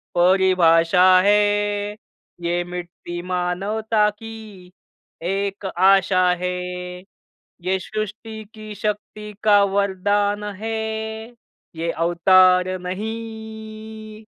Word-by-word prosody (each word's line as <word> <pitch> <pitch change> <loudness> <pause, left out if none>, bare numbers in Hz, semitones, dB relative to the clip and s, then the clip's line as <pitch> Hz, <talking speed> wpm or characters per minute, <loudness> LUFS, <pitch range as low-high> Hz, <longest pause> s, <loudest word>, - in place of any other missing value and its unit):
परिभाषा 180 -1 +4 0.2
है, 205 0 +1 0.5
ये 175 +1 0
मिट्टी 175 0 -7
मानवता 210 +5 0
की 210 -4 -11 0.6
एक 195 0 -3
आशा 190 0 +4 0.2
है, 180 - 0 1.1
ये 185 +2 0
सृष्टी 215 +2 -6
की 215 -1 -9
शक्ति 210 +1 -4
का 205 -1 +6
वरदान 200 +1 0 0.2
है, 225 0 -2 1.0
ये 165 +1 -2
अवतार 180 +2 +4
नहीं, 220 +2 -7
200 Hz, 80 wpm, -21 LUFS, 180-215 Hz, 1.1 s, का